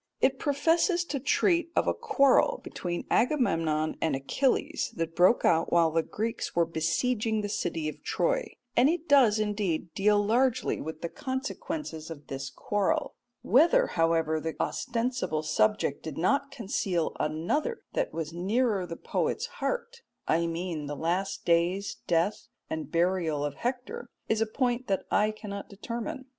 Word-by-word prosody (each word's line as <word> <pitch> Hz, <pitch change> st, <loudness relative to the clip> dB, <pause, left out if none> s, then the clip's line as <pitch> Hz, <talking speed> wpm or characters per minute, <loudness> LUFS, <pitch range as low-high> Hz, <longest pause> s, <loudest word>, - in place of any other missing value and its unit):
It 265 Hz, 0 st, +2 dB
professes 330 Hz, +5 st, +2 dB
to 285 Hz, -4 st, -3 dB
treat 340 Hz, +5 st, +2 dB
of -, -, +3 dB
a -, -, +3 dB
quarrel 280 Hz, -, +3 dB
between 175 Hz, -1 st, -4 dB
Agamemnon 165 Hz, -, +1 dB
and 160 Hz, -4 st, +1 dB
Achilles 270 Hz, -, 0 dB
that 165 Hz, -1 st, -3 dB
broke 180 Hz, +7 st, +4 dB
out 165 Hz, 0 st, +3 dB
while 165 Hz, -2 st, +4 dB
the 165 Hz, +1 st, +2 dB
Greeks 225 Hz, +7 st, -4 dB
were 170 Hz, 0 st, +4 dB
besieging 210 Hz, +8 st, 0 dB
the 205 Hz, -, -2 dB
city 165 Hz, -6 st, -2 dB
of 155 Hz, -, -6 dB
Troy, -, -, 0 dB, 0.2 s
and 250 Hz, +4 st, +5 dB
it 335 Hz, 0 st, -2 dB
does, 255 Hz, -7 st, +6 dB
indeed, 200 Hz, -6 st, -1 dB
deal 210 Hz, 0 st, +3 dB
largely 245 Hz, +4 st, +1 dB
with 160 Hz, +1 st, -6 dB
the -, -, -2 dB
consequences 260 Hz, -, -5 dB
of 150 Hz, -3 st, -9 dB
this 135 Hz, 0 st, -4 dB
quarrel; 205 Hz, +6 st, -1 dB, 0.3 s
whether, 345 Hz, -, +5 dB
however, 165 Hz, -1 st, +2 dB
the 160 Hz, +1 st, -4 dB
ostensible 240 Hz, -, -1 dB
subject 185 Hz, -1 st, +1 dB
did 155 Hz, -3 st, -7 dB
not 280 Hz, -, +1 dB
conceal 190 Hz, -, -2 dB
another 175 Hz, -, -1 dB
that -, -, 0 dB
was 165 Hz, -1 st, -4 dB
nearer 200 Hz, +2 st, 0 dB
the 165 Hz, -, -6 dB
poet's -, -, -1 dB, 0.2 s
heart 480 Hz, -1 st, -2 dB, 0.3 s
I 170 Hz, +1 st, +2 dB
mean 165 Hz, -3 st, -3 dB
the 145 Hz, -, -4 dB
last 180 Hz, +6 st, -2 dB
days, 175 Hz, +4 st, +1 dB
death, 170 Hz, +5 st, +1 dB, 0.2 s
and 160 Hz, 0 st, -3 dB
burial 170 Hz, -4 st, +1 dB
of 145 Hz, -, -3 dB
Hector 245 Hz, -, -4 dB, 0.2 s
is 220 Hz, 0 st, +1 dB
a 225 Hz, -, +2 dB
point 245 Hz, +1 st, -1 dB
that 195 Hz, -1 st, 0 dB
I 210 Hz, +1 st, +3 dB
cannot 205 Hz, -2 st, -7 dB
determine. 235 Hz, +7 st, -5 dB
205 Hz, 150 wpm, -28 LUFS, 165-260 Hz, 0.3 s, does